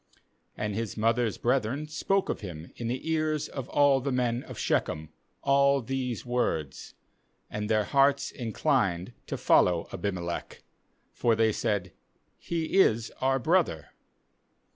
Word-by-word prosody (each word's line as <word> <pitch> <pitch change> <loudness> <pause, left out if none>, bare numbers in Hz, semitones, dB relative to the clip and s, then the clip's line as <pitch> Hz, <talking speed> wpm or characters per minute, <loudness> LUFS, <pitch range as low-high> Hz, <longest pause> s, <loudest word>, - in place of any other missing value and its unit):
3And 105 -1 -2
his 115 +1 -4
mother's 115 0 +1
brethren 130 +4 0
spoke 195 +5 0
of - - -3
him 85 -5 -8
in 120 - -4
the 125 +6 -3
ears 155 -2 0
of 135 -2 -6
all 140 -2 +4
the 140 +2 -2
men 125 -1 0
of - - -10
Shechem 75 0 -1 0.3
all 140 0 +4
these 125 -1 -3
words; 100 - -2 0.6
and 105 0 -3
their 110 -1 +3
hearts 140 +3 +2
inclined 115 - 0
to - - -3
follow 85 -2 +3
Abimelech; 90 -4 -4 0.5
for 115 -2 +2
they 110 0 +3
said: 100 -4 -1 0.5
'He 170 +2 -1
is 115 - +3
our 135 +1 +3
brother.' 155 - +1
120 Hz, 135 wpm, -28 LUFS, 105-140 Hz, 0.6 s, all